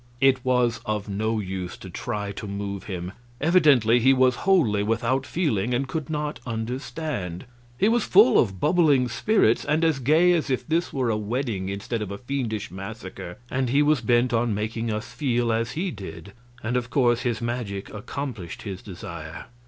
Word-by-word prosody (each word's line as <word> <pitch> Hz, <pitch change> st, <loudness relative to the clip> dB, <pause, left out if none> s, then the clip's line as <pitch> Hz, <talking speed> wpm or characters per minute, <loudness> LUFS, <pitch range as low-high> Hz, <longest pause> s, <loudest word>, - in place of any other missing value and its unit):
It 135 Hz, -2 st, +4 dB
was 125 Hz, -2 st, +1 dB
of 105 Hz, -1 st, -2 dB
no 110 Hz, +3 st, -1 dB
use 95 Hz, -3 st, -5 dB
to -, -, -10 dB
try 105 Hz, +2 st, -4 dB
to 100 Hz, +1 st, -7 dB
move 100 Hz, 0 st, -4 dB
him; 90 Hz, -2 st, -5 dB, 0.3 s
evidently 145 Hz, -8 st, +5 dB
he 130 Hz, +3 st, +5 dB
was 130 Hz, -1 st, +4 dB
wholly 125 Hz, -, +4 dB
without 115 Hz, +5 st, 0 dB
feelings, 125 Hz, -, 0 dB
and 135 Hz, +2 st, -1 dB
could 155 Hz, 0 st, -4 dB
not 150 Hz, -1 st, -3 dB
understand. 115 Hz, -, -4 dB, 0.3 s
He 200 Hz, -, +3 dB
was 230 Hz, 0 st, +3 dB
full 125 Hz, -, +6 dB
of 95 Hz, -5 st, +1 dB
bubbling 150 Hz, -, +3 dB
spirits, 120 Hz, -, +2 dB
and 155 Hz, +3 st, +1 dB
as 160 Hz, -4 st, +2 dB
gay 160 Hz, +7 st, +4 dB
as 160 Hz, -3 st, 0 dB
if 130 Hz, +3 st, -1 dB
this 165 Hz, +2 st, 0 dB
were 130 Hz, -4 st, 0 dB
a 105 Hz, -, 0 dB
wedding 105 Hz, -3 st, -2 dB
instead 100 Hz, +4 st, -3 dB
of 105 Hz, -, -4 dB
a 100 Hz, -, -5 dB
fiendish 120 Hz, -6 st, -3 dB
massacre. 95 Hz, -2 st, -8 dB
And 130 Hz, -1 st, 0 dB
he 140 Hz, +4 st, +4 dB
was 150 Hz, -3 st, +3 dB
bent 120 Hz, +1 st, +2 dB
on 115 Hz, -2 st, +1 dB
making 115 Hz, +2 st, -2 dB
us 105 Hz, 0 st, -4 dB
feel 120 Hz, -5 st, 0 dB
as 115 Hz, +2 st, -1 dB
he 180 Hz, +4 st, -2 dB
did, 95 Hz, -2 st, -9 dB, 0.3 s
and 115 Hz, +3 st, -1 dB
of 125 Hz, -1 st, -1 dB
course 120 Hz, 0 st, +2 dB
his 120 Hz, -3 st, -1 dB
magic 115 Hz, -5 st, -4 dB
accomplished 105 Hz, -, -6 dB
his 95 Hz, -3 st, -6 dB
desire. 95 Hz, -5 st, -8 dB
120 Hz, 180 wpm, -25 LUFS, 105-135 Hz, 0.3 s, full